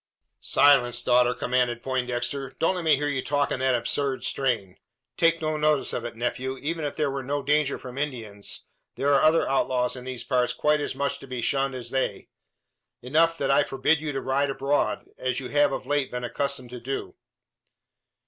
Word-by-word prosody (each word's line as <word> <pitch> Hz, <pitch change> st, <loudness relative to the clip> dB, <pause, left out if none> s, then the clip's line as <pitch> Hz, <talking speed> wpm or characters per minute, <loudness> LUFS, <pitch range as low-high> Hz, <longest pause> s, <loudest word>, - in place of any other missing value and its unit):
"Silence, 120 Hz, -4 st, +4 dB
daughter!" 125 Hz, 0 st, +4 dB
commanded 125 Hz, -1 st, 0 dB
Poindexter. 130 Hz, +1 st, -2 dB
"Don't 165 Hz, -, +2 dB
let 180 Hz, -2 st, -4 dB
me 160 Hz, -2 st, +5 dB
hear 145 Hz, +2 st, -2 dB
you 135 Hz, -3 st, -1 dB
talk 145 Hz, -1 st, 0 dB
in -, -, -1 dB
that 130 Hz, -1 st, +2 dB
absurd 130 Hz, +3 st, -1 dB
strain. 115 Hz, -9 st, -1 dB, 0.4 s
Take 165 Hz, -1 st, +2 dB
no 155 Hz, 0 st, 0 dB
notice 150 Hz, -1 st, +1 dB
of 120 Hz, -, -3 dB
it, 120 Hz, -, -6 dB
nephew. 125 Hz, +3 st, -3 dB
Even 155 Hz, +3 st, -3 dB
if 145 Hz, -, -3 dB
there 150 Hz, -3 st, 0 dB
were 135 Hz, 0 st, -3 dB
no 140 Hz, +2 st, -2 dB
danger 145 Hz, 0 st, +2 dB
from 125 Hz, +1 st, -8 dB
Indians, 115 Hz, -8 st, -4 dB, 0.3 s
there 140 Hz, +1 st, +2 dB
are 140 Hz, -, +5 dB
other 155 Hz, +1 st, +4 dB
outlaws 130 Hz, -2 st, +1 dB
in 125 Hz, -, -8 dB
these 125 Hz, -2 st, -5 dB
parts 125 Hz, -1 st, +1 dB
quite 150 Hz, +4 st, +2 dB
as 145 Hz, -, -3 dB
much 140 Hz, +1 st, -1 dB
to 135 Hz, -, -12 dB
be 125 Hz, -1 st, -5 dB
shunned 135 Hz, +2 st, 0 dB
as 120 Hz, -2 st, -5 dB
they. 135 Hz, 0 st, -2 dB, 0.7 s
Enough 165 Hz, +6 st, +3 dB
that 140 Hz, -2 st, 0 dB
I 140 Hz, -, +5 dB
forbid 145 Hz, +3 st, +1 dB
you 155 Hz, -1 st, -3 dB
to 135 Hz, -1 st, -3 dB
ride 140 Hz, +2 st, +1 dB
abroad, 135 Hz, +1 st, 0 dB
as 130 Hz, -1 st, -1 dB
you 130 Hz, -, -6 dB
have 145 Hz, -1 st, +3 dB
of 135 Hz, -1 st, -4 dB
late 145 Hz, 0 st, 0 dB
been 125 Hz, 0 st, -5 dB
accustomed 130 Hz, 0 st, -2 dB
to 125 Hz, -, -7 dB
do." 135 Hz, +3 st, -4 dB
135 Hz, 195 wpm, -26 LUFS, 125-145 Hz, 0.7 s, me